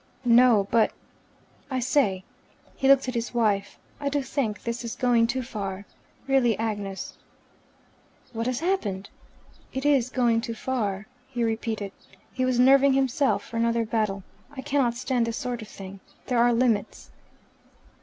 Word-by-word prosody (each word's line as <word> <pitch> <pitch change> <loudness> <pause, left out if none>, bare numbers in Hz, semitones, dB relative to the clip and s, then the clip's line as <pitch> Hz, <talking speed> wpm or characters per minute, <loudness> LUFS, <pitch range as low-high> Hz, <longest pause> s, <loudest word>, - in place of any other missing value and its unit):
"No. 235 -4 +5
But, 225 -1 +3 0.8
I 260 -2 -1
say," 240 -7 +1 0.5
he 270 - 0
looked 275 -1 +5
at 255 - -2
his 235 0 -3
wife, 205 -4 0 0.2
"I 285 -1 -1
do 285 0 -1
think 245 -6 -2
this 235 +1 -3
is 235 - -5
going 240 -3 +3
too 260 +2 -2
far. 200 -5 -5 0.4
Really, 260 -5 +3
Agnes." 205 -3 -4 1.1
"What 230 +1 -2
has 255 +2 -1
happened?" 210 - -2 0.6
"It 265 +1 -4
is 270 -4 +3
going 240 -3 +2
too 230 -1 -5
far," 215 -5 -2 0.2
he 250 -3 -3
repeated. 220 -3 -2 0.4
He 255 0 0
was 255 -1 +1
nerving 270 +2 +6
himself 270 +1 +1
for 230 - -6
another 230 0 +1
battle. 215 -3 -1 0.3
"I 265 - -5
cannot 270 -4 +1
stand 245 -1 0
this 230 - -3
sort 250 -4 -4
of 220 - -9
thing. 195 -1 -10 0.3
There 245 -2 0
are 240 +1 +5
limits." 230 -3 0
235 Hz, 155 wpm, -26 LUFS, 220-260 Hz, 1.1 s, nerving